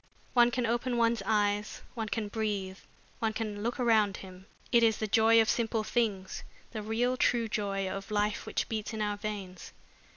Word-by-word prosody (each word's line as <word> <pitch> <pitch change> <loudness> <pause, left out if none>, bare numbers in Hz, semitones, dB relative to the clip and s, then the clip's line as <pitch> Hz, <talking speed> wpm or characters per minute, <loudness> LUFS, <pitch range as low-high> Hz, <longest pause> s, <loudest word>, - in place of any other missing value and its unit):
One 240 -1 +6
can 245 0 -1
open 240 +2 0
one's 230 -2 +2
eyes, 210 -1 0
one 225 -3 -4
can 220 -1 -2
breathe, 205 -3 -3 0.4
one 220 -1 0
can 215 -2 -4
look 235 +4 -2
around 220 -5 +3
him. 185 0 -12 0.2
It 235 - +5
is 225 -2 +4
the 220 - -2
joy 225 +2 +5
of 220 - +4
simple 225 -1 0
things, 210 -5 -1 0.3
the 220 - -4
real 230 +4 0
true 240 -2 +2
joy 200 -2 -1
of 195 +1 -5
life 210 0 0
which - - -1
beats 220 0 -4
in 220 - -3
our 205 0 -1
veins. 200 -4 -6
215 Hz, 185 wpm, -30 LUFS, 205-230 Hz, 0.4 s, One